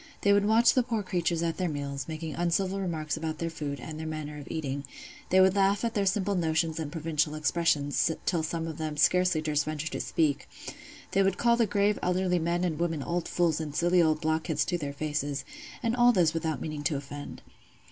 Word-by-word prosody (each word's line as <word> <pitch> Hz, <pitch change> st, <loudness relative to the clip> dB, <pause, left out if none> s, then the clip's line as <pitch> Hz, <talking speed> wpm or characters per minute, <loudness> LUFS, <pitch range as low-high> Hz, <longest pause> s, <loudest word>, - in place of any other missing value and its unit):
They 200 Hz, -, +4 dB
would 200 Hz, 0 st, +3 dB
watch 225 Hz, +2 st, +5 dB
the 255 Hz, -, +4 dB
poor 230 Hz, -3 st, -2 dB
creatures 170 Hz, -2 st, -1 dB
at 165 Hz, -1 st, -1 dB
their 180 Hz, -2 st, 0 dB
meals, 140 Hz, -2 st, -4 dB
making 160 Hz, -1 st, -5 dB
uncivil 185 Hz, +3 st, 0 dB
remarks 160 Hz, -5 st, -2 dB
about 160 Hz, 0 st, -3 dB
their 165 Hz, 0 st, -3 dB
food, 145 Hz, -3 st, -4 dB
and 155 Hz, -1 st, -7 dB
their 160 Hz, -, -4 dB
manner 150 Hz, -1 st, -5 dB
of 145 Hz, -, -10 dB
eating; 140 Hz, -3 st, -3 dB, 0.5 s
they 185 Hz, -, +5 dB
would 190 Hz, 0 st, +5 dB
laugh 200 Hz, +2 st, +2 dB
at 230 Hz, -, -1 dB
their 200 Hz, -2 st, +1 dB
simple 200 Hz, +1 st, +1 dB
notions 165 Hz, -2 st, 0 dB
and 150 Hz, -2 st, -4 dB
provincial 155 Hz, -2 st, -1 dB
expressions, 155 Hz, -2 st, +1 dB, 0.2 s
till 170 Hz, -3 st, +1 dB
some 165 Hz, +1 st, -3 dB
of 160 Hz, -2 st, -6 dB
them 155 Hz, -1 st, -3 dB
scarcely 180 Hz, +2 st, +3 dB
durst 150 Hz, -1 st, +1 dB
venture 155 Hz, +1 st, -3 dB
to -, -, -3 dB
speak; 150 Hz, -4 st, 0 dB, 0.6 s
they 195 Hz, -, +3 dB
would 195 Hz, -1 st, +2 dB
call 235 Hz, 0 st, +4 dB
the 235 Hz, -2 st, +2 dB
grave 205 Hz, +1 st, +1 dB
elderly 180 Hz, 0 st, +1 dB
men 170 Hz, +2 st, 0 dB
and 165 Hz, -4 st, -1 dB
women 165 Hz, -4 st, -1 dB
old 175 Hz, 0 st, -2 dB
fools 165 Hz, -3 st, +1 dB
and 150 Hz, -2 st, -5 dB
silly 175 Hz, +2 st, +3 dB
old 155 Hz, -1 st, +2 dB
blockheads 160 Hz, 0 st, 0 dB
to 175 Hz, -, -1 dB
their 145 Hz, -2 st, -3 dB
faces: 145 Hz, -1 st, -3 dB, 0.4 s
and 230 Hz, 0 st, +1 dB
all 245 Hz, 0 st, +6 dB
this 175 Hz, -8 st, +3 dB
without 160 Hz, -1 st, -2 dB
meaning 155 Hz, -2 st, -4 dB
to 160 Hz, -, +1 dB
offend. 145 Hz, +1 st, -7 dB
165 Hz, 215 wpm, -28 LUFS, 155-185 Hz, 0.6 s, all